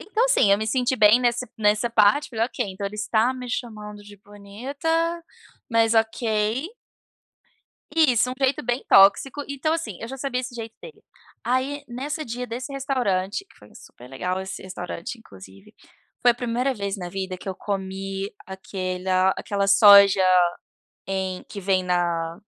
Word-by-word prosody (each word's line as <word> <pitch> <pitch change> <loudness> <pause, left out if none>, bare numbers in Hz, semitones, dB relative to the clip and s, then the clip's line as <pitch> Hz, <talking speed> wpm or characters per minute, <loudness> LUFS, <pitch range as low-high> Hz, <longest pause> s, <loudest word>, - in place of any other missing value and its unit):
então, 440 +4 0
assim, - - +3
eu 200 - +3
me 220 - -3
senti 255 +2 0
bem 215 +3 +6
nessa 245 0 0
nessa 215 +2 +2
parte. 225 +5 +3
Falei: 225 -1 0
"Ok, 245 -1 -3
então 190 +2 -7
ele 205 - -7
está 220 +3 +1
me 255 -1 -8
chamando 210 -4 -6
de 205 0 -14
bonita, 205 - -8 0.8
mas 230 0 +3
ok." 220 +3 0 1.3
Isso, 255 -7 +3
um - - -3
jeito 265 0 +1
bem 245 +2 -2
tóxico. 200 +9 +5
Então, 280 +3 -1
assim, 235 - -4
eu 230 - -5
já 270 +2 -7
sabia 255 -1 -2
esse 255 -1 -8
jeito 225 -1 -7
dele. 475 - -12 0.4
Aí, 270 +3 -1
nessa 285 +6 -5
dia 245 +2 -5
desse 250 +4 -6
restaurante, 255 - -1
que - - -23
foi 105 - -18
superlegal 135 +10 -6
esse 190 0 -7
restaurante, 180 +3 -6
inclusive, 95 - -15 0.5
foi 245 - +6
a - - -4
primeira 245 +2 -1
vez 200 -3 -4
na 180 -2 -6
vida 190 0 -5
que 180 - -12
eu 190 - -2
comi 195 0 -4
aquela 185 -1 -1
aquela 200 -1 -2
soja 200 -1 +7 0.9
em 190 -1 -3
que 200 - -7
vem 190 -1 +1
na 170 -1 -1
215 Hz, 160 wpm, -24 LUFS, 195-250 Hz, 1.3 s, soja